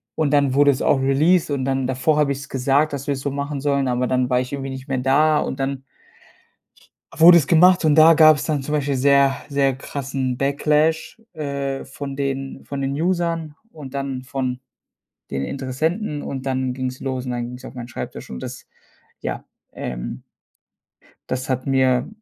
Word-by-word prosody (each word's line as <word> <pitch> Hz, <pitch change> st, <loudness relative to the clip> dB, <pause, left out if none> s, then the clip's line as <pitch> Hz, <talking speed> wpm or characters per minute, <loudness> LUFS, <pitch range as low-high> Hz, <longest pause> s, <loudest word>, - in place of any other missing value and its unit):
Und 150 Hz, -3 st, 0 dB
dann 140 Hz, -2 st, +3 dB
wurde 145 Hz, +1 st, +5 dB
es 135 Hz, -, -3 dB
auch 135 Hz, -, +3 dB
released, 155 Hz, +6 st, +2 dB
und 140 Hz, -2 st, -1 dB
dann 135 Hz, -1 st, -1 dB
davor 130 Hz, +4 st, +1 dB
habe 145 Hz, -2 st, +2 dB
ich's 140 Hz, +1 st, -9 dB
gesagt, 140 Hz, +3 st, +1 dB
dass 140 Hz, 0 st, -5 dB
wir 145 Hz, -, +1 dB
es 135 Hz, -, -6 dB
so 140 Hz, 0 st, -2 dB
machen 140 Hz, 0 st, -4 dB
sollen, 140 Hz, -2 st, +1 dB
aber 125 Hz, 0 st, 0 dB
dann 125 Hz, 0 st, 0 dB
war 125 Hz, -1 st, +2 dB
ich 125 Hz, -, -6 dB
irgendwie 135 Hz, -1 st, -4 dB
nicht 130 Hz, 0 st, -8 dB
mehr 135 Hz, -, 0 dB
da, 150 Hz, +4 st, +3 dB
und 135 Hz, -, -3 dB
dann 135 Hz, 0 st, -3 dB, 1.3 s
wurde 170 Hz, +2 st, +8 dB
es 145 Hz, -, +1 dB
gemacht. 180 Hz, +1 st, +5 dB
Und 150 Hz, -2 st, +4 dB
da 160 Hz, +1 st, +8 dB
gab's 155 Hz, -2 st, +6 dB
dann 150 Hz, -3 st, -1 dB
zum 150 Hz, +3 st, -4 dB
Beispiel 145 Hz, -2 st, 0 dB
sehr, 140 Hz, 0 st, +4 dB
sehr 140 Hz, -2 st, +1 dB
krassen 135 Hz, -2 st, -4 dB
Backlash, 150 Hz, +7 st, 0 dB
äh, 140 Hz, -3 st, -4 dB
von 140 Hz, 0 st, -7 dB
den 135 Hz, -1 st, -4 dB
von 140 Hz, -1 st, -5 dB
den 135 Hz, -, -1 dB
Usern 170 Hz, -3 st, -1 dB, 0.2 s
und 140 Hz, -4 st, -10 dB
dann 135 Hz, -2 st, -4 dB
von 130 Hz, -1 st, -3 dB, 0.7 s
den 70 Hz, 0 st, -2 dB
Interessenten. 145 Hz, -, -2 dB
Und 135 Hz, -2 st, -6 dB
dann 130 Hz, -1 st, -1 dB
ging's 130 Hz, 0 st, -4 dB
los, 130 Hz, -1 st, -3 dB
und 125 Hz, -, -3 dB
dann 120 Hz, -1 st, -3 dB
ging's 125 Hz, +2 st, -10 dB
auf -, -, -9 dB
meinen 120 Hz, -1 st, -8 dB
Schreibtisch. 120 Hz, -, -7 dB
Und 65 Hz, -, -7 dB
das, -, -, -8 dB, 0.5 s
ja, -, -, -4 dB, 0.3 s
ähm -, -, -6 dB, 1.1 s
das 130 Hz, +1 st, -3 dB
hat 130 Hz, -1 st, -1 dB
mir 130 Hz, -2 st, +2 dB
135 Hz, 185 wpm, -21 LUFS, 130-150 Hz, 1.3 s, wurde